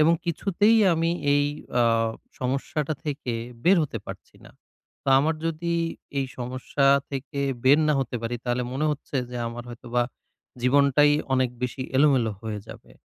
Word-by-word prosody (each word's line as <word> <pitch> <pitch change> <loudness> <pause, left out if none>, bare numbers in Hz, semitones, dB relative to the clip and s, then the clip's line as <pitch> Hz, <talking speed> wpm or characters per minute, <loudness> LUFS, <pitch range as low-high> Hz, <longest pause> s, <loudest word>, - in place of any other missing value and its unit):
এবং 160 +2 +6
কিছুতেই 200 +6 +2 0.2
আমি 165 +1 +1 0.2
এই 145 0 +3 0.4
আ - - +5 0.6
সমস্যাটা 140 +4 -2
থেকে 140 -4 -3 0.3
বের 185 +2 +6
হতে 130 -7 -3
পারছি - - -10
না। - - -14 0.5
তো - - -4
আমার 155 +4 +1
যদি 165 +1 -2 0.5
এই 135 - 0
সমস্যা 130 +3 -1 0.2
থেকে 140 +1 -4 0.2
বের 140 +4 +6
না - - +4
হতে 125 - -3
পারি 115 +1 -2
তাহলে 120 0 0
মনে 140 +4 -1
হচ্ছে 145 -1 -4
যে, 125 - -5
আমার 120 +1 -7
হয়তো 120 +1 -11
বা 120 - +4 0.6
জীবনটাই 140 +2 +4 0.2
অনেক 130 -2 +2
বেশি 125 +1 -2
এলোমেলো 130 -6 +4
হয়ে 110 -2 -4
যাবে। - - -12
140 Hz, 155 wpm, -25 LUFS, 125-150 Hz, 0.6 s, এবং